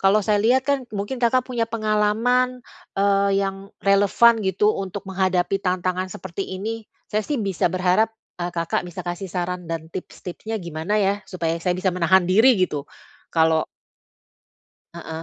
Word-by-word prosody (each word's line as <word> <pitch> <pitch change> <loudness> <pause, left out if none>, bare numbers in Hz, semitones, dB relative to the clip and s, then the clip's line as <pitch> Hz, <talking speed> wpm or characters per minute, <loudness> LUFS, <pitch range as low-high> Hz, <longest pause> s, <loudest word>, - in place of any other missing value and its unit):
kalau 195 +2 +5
saya 210 0 +2
lihat 245 +5 +3
kan 280 -1 +2
mungkin 205 +5 -3
Kakak 245 +2 +3
punya 240 -3 -1
pengalaman, 230 +4 +1 0.4
eee, 200 0 +3
yang 195 0 -4 0.2
relevan 205 +4 +5
gitu 195 +2 +2
untuk 195 +1 -5
menghadapi 185 -1 +1
tantangan 185 0 -1
seperti 175 +3 -5
ini. 225 +3 -4 0.3
Saya 210 - +2
sih 295 - -1
bisa 195 -4 0
berharap, 185 +4 +3 0.3
eee, 175 - -1
Kakak 170 -1 -1
bisa 175 +1 -7
kasih 175 +2 -4
saran 180 -1 -3
dan 165 -1 -4
tips-tipsnya 185 +4 -6
gimana 170 +4 -2
ya, 195 0 +2
supaya 165 -3 -2
saya 180 +1 0
bisa 185 0 0
menahan 180 +1 +4
diri 220 +8 +5
gitu, 150 -6 -1 0.4
kalau 160 -1 +2 1.3
Heeh,, 160 -1 -7
195 Hz, 150 wpm, -23 LUFS, 180-215 Hz, 1.3 s, kalau